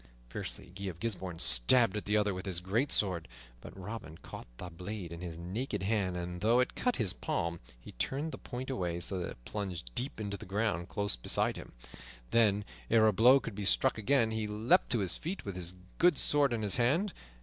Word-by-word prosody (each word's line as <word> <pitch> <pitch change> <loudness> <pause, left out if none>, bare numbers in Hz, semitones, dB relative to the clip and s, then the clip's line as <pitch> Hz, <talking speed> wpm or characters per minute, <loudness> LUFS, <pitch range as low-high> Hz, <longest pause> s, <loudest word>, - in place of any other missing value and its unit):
Fiercely 85 - -4
Guy 100 +1 -7
of 90 -3 -5
Gisbourne 95 -5 -3
stabbed 95 - +5
at 105 - -3
the 105 +1 +2
other 105 -1 +1
with 95 +2 -6
his 90 -3 0
great 110 +10 0
sword, 90 -5 +1 0.3
but - - -11
Robin 95 -5 -7
caught - - -10
the 90 -1 -8
blade 90 +1 -6
in 85 0 -8
his 85 -3 -6
naked 100 +4 -4
hand, 95 -3 0
and, 90 0 -5
though 115 +3 +4
it 125 - +1
cut 250 - 0
his 100 -7 +1
palm, 85 -1 -2 0.2
he - - -12
turned 140 - -2
the - - -8
point 130 +1 -6
away 90 -8 -2
so 90 +2 +2
that 85 - -3
it - - -12
plunged 90 - -5
deep 130 -1 -3
into 100 -1 -4
the - - -10
ground 95 -3 -1
close 100 -1 -1
beside - - +1
him; - - -10 0.6
then, 105 -3 +3 0.2
ere 110 -1 +5
a 110 - +4
blow 125 +7 +6
could 115 - -7
be 105 +1 -5
struck 120 +4 +2
again, 115 0 +2
he 110 -1 -2
leaped 105 +3 +2
to 120 - +1
his 95 - +2
feet, 180 +5 -5
with 100 -2 -5
his 90 0 -3 0.2
good 175 -4 +5
sword 145 -2 +4
in 115 -2 -1
his 105 +3 +2
hand. 155 - +2
100 Hz, 215 wpm, -32 LUFS, 90-115 Hz, 0.6 s, blow